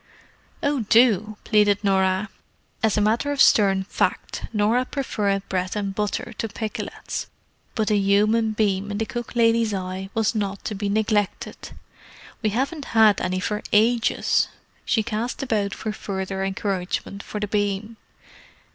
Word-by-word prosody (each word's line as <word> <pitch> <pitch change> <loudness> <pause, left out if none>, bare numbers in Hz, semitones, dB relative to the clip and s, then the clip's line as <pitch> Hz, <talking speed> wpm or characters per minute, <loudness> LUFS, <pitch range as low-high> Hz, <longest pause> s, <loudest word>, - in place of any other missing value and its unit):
"Oh, 285 -1 +1
do!" 215 -3 +4
pleaded 210 -2 +3
Norah. 190 +1 +2 0.5
As 220 -2 +2
a - - +3
matter 225 +7 +1
of 285 - -3
stern 195 -6 +5
fact, 190 - -2
Norah 225 +4 +2
preferred 205 -8 -1
bread 185 0 -2
and 200 -2 -2
butter 210 0 -2
to 225 - -1
pikelets, 220 0 -5 0.5
but 220 -1 0
the 210 - +3
human 215 +3 +3
beam 205 -2 0
in 205 - -3
the 225 - -1
cook 240 +1 -6
lady's 230 -2 +3
eye 185 0 -4
was 225 0 +2
not 200 -3 -3
to - - -2
be 200 0 -2
neglected. 210 -1 -1 0.7
"We 215 - +1
haven't 275 +7 -2
had 215 -2 +6
any 185 0 -1
for 210 +3 -2
ages." 230 +2 +3 0.4
She 220 - +2
cast 235 +4 -3
about 210 -6 -1
for 215 - -4
further 190 -2 -4
encouragement 195 -1 -3
for 210 - -6
the 210 - -2
beam. 205 +2 -1
210 Hz, 145 wpm, -23 LUFS, 195-225 Hz, 0.7 s, had